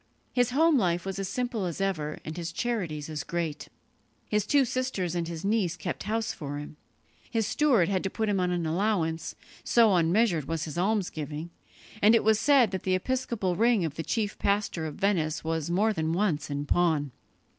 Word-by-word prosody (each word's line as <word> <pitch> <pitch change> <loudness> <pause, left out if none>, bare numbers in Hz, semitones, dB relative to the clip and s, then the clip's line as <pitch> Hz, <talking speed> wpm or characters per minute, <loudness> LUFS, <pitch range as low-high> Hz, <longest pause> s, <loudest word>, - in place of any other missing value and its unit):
His 245 -2 +2
home 305 +2 +4
life 175 -3 0
was 195 0 -4
as 195 -1 -3
simple 245 -5 -2
as 170 0 -4
ever, 160 -6 -1
and 155 - -5
his 170 -1 -4
charities 175 -11 -2
as 155 -3 -4
great. 165 -3 -3 0.6
His 210 -1 0
two 280 -2 +4
sisters 240 -9 -2
and 170 -1 -2
his 170 +1 -6
niece 200 -5 +1
kept 175 -1 -4
house 220 +2 -1
for 145 -2 -6
him. 145 +1 -8 0.5
His 225 -2 0
steward 245 - +3
had 190 -2 0
to - - +1
put 220 +3 -2
him 200 -2 +1
on 180 0 +1
an 175 -2 -1
allowance, 165 -2 -1 0.3
so 230 -4 +4
unmeasured 175 - +2
was 165 +1 -2
his 155 - -7
almsgiving, 170 -5 -2 0.5
and 215 +3 +6
it 230 - +3
was 220 0 +4
said 265 -7 +4
that 190 - -3
the 185 -1 +1
episcopal 230 -3 -1
ring 225 -2 +3
of 155 - -3
the 165 - -4
chief 210 +4 -2
pastor 200 -5 0
of 150 - -7
Venice 165 -6 0
was 160 -1 -2
more 210 +5 +2
than 160 -3 -1
once 170 -6 0
in 145 0 -3
pawn. 155 -4 +1
185 Hz, 195 wpm, -28 LUFS, 160-220 Hz, 0.6 s, and